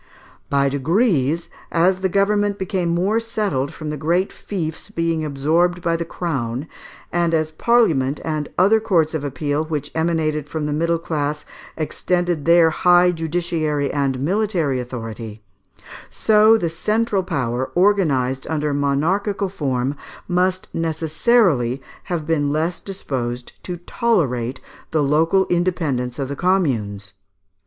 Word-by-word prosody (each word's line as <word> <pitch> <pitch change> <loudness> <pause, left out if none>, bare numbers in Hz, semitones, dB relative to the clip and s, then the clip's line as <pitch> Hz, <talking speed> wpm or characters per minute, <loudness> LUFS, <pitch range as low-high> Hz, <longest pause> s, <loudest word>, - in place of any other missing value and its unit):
By 140 -1 +2
degrees, 160 - +1 0.2
as 185 +3 +2
the 190 - +1
government 205 +1 +1
became 190 -2 -1
more 185 +6 +1
settled 205 -12 -2
from 155 -1 -6
the 150 - -4
great 175 +5 +1
fiefs 165 -3 -5
being 165 -5 -1
absorbed 160 +5 +1
by 170 0 +1
the 170 0 -2
Crown, 135 -6 -3 0.4
and 170 -1 +1
as 155 -1 0
parliament 155 - +2
and 155 -2 -2
other 200 +5 +5
courts 170 -8 +1
of 155 -3 -2
appeal 145 +2 -1
which 155 -3 -4
emanated 160 -2 0
from 155 0 -3
the 150 - -1
middle 170 +2 +1
class 150 -2 -3 0.3
extended 175 0 -1
their 170 -1 +6
high 180 +2 +4
judiciary 160 -3 -1
and 135 -3 0
military 170 -4 0
authority, 115 -3 -7 0.7
so 215 +1 +5
the 175 -6 -1
central 210 +5 0
power, 130 -7 -2
organized 150 -10 +2
under 150 -2 -1
monarchical 175 +9 0
form, 135 -6 -1 0.3
must 185 +1 0
necessarily 160 - +2 0.3
have 170 -4 -3
been 150 -3 +1
less 160 +4 -1
disposed 125 -10 -4
to 180 -1 -5
tolerate 150 - 0 0.3
the 155 -2 +1
local 165 +7 +3
independence 160 -9 0
of 135 -2 -2
the 140 - -4
Communes. 115 - 0
160 Hz, 130 wpm, -21 LUFS, 140-180 Hz, 0.7 s, their